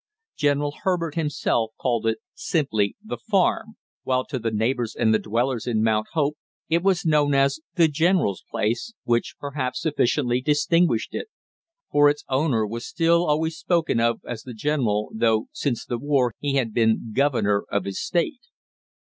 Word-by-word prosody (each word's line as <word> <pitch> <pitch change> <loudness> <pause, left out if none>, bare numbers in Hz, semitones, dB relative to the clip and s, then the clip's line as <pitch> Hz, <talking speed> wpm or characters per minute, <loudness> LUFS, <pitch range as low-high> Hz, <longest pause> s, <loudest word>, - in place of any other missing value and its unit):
General 145 0 +1
Herbert 175 -5 0
himself 150 -8 -1
called 115 -3 0
it 110 - +1 0.2
simply 110 - 0
the 220 - -5
farm, 220 +2 0 0.3
while 130 0 0
to 130 -1 -4
the 115 0 -1
neighbors 115 +2 -1
and 110 - +2
the 110 - +3
dwellers 120 +2 -1
in 110 -3 +1
Mount 110 -1 +1
Hope 150 -2 0 0.3
it 165 +2 +2
was 190 -2 +1
known 150 -3 +3
as 135 +2 +2 0.2
the 165 -2 +5
general's 160 - +1
place, 120 - -1
which 120 0 0
perhaps 135 -3 -3
sufficiently 125 -4 +1
distinguished 150 -1 +2
it; - - -4 0.6
for 145 0 +6
its 145 0 -3
owner 130 -5 +1
was 115 +3 -5
still 170 +1 +2
always 160 +2 +1
spoken 165 -8 0
of 115 0 +1
as 120 -2 -5
the 125 -1 -9
general, 110 -6 0
though 110 0 +2
since 130 -6 -2
the 120 - -3
war 135 -3 +1
he 140 -1 -1
had 120 -5 0
been 110 0 +1
governor 120 -7 +2
of 100 -2 -1
his 100 -1 -4
state. 245 - -1
135 Hz, 165 wpm, -24 LUFS, 115-155 Hz, 0.6 s, for